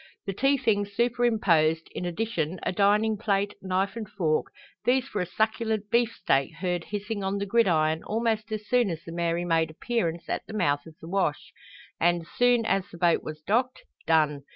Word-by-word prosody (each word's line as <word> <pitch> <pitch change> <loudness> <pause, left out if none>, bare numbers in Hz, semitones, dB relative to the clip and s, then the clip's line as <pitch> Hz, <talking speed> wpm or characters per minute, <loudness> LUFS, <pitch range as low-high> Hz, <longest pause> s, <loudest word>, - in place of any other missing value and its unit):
The 195 - -2
tea 275 +7 +2
things 205 -4 0
superimposed, 205 -10 +2
in 180 - -4
addition 175 -2 -2
a - - 0
dining 210 +3 +3
plate, 200 -1 0
knife 190 +2 -1
and 220 -3 -6
fork, 155 -6 0 0.4
these 250 +2 +2
for 205 - -3
a 180 - -2
succulent 220 +1 -1
beefsteak 195 - +1
heard 175 0 -2
hissing 205 0 -4
on 195 +1 -1
the 200 - -2
gridiron 165 -8 +2
almost 220 0 -1
as 215 -1 -4
soon 245 -4 +3
as 165 -1 -5
the 165 - -9
Mary 170 0 -1
made 165 -2 +2
appearance 170 -2 -2
at - - -2
the - - -8
mouth 145 -6 +1
of 160 - -13
the 160 - -9
wash, 180 -5 -1 0.5
and, 170 0 +2
soon 245 -2 +3
as 195 -4 0
the 170 - -11
boat 170 -1 +3
was 155 0 -7
docked, 245 +8 0 0.2
done. 155 -3 +3
195 Hz, 180 wpm, -27 LUFS, 165-220 Hz, 0.5 s, dining